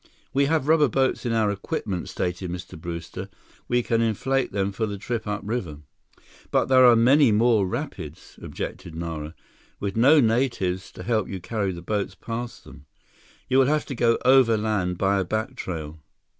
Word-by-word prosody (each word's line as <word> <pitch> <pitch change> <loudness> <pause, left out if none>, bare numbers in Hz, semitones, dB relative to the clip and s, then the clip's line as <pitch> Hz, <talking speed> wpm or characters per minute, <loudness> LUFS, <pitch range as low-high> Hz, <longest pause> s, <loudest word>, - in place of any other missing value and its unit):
"We 140 +1 +3
have 155 -1 0
rubber 155 -2 +5
boats 130 0 0
in - - 0
our 110 -2 +2
equipment," 95 -2 -4
stated 90 +1 -3
Mr. 90 +1 -7
Brewster. 85 +1 -6 0.4
"We 120 0 +1
can 115 0 +1
inflate 125 +4 0
them 100 0 -1
for 110 +3 -2
the 100 -1 -5
trip 110 +2 -4
upriver." 105 -7 -3 0.7
"But - - +2
there 130 -1 +7
are 120 - +7
many 130 +3 +5
more 110 -2 +3
rapids," - - -6
objected 80 - -6
Nara, 80 -1 -5 0.4
"with 100 -1 -3
no 135 +7 +6
natives 110 -7 0
to 90 - -9
help 110 -1 0
you 95 - -5
carry 100 0 -2
the 85 -1 -8
boats 105 +2 -2
past 115 +1 -6
them. 75 -1 -15 0.6
You 130 - +3
will 130 - +5
have 150 +1 +1
to - - -5
go 115 -1 +2
overland 110 -8 +3
by 100 +1 +2
a - - +1
back 110 +7 -3
trail." 80 -8 -6
110 Hz, 170 wpm, -24 LUFS, 95-125 Hz, 0.7 s, there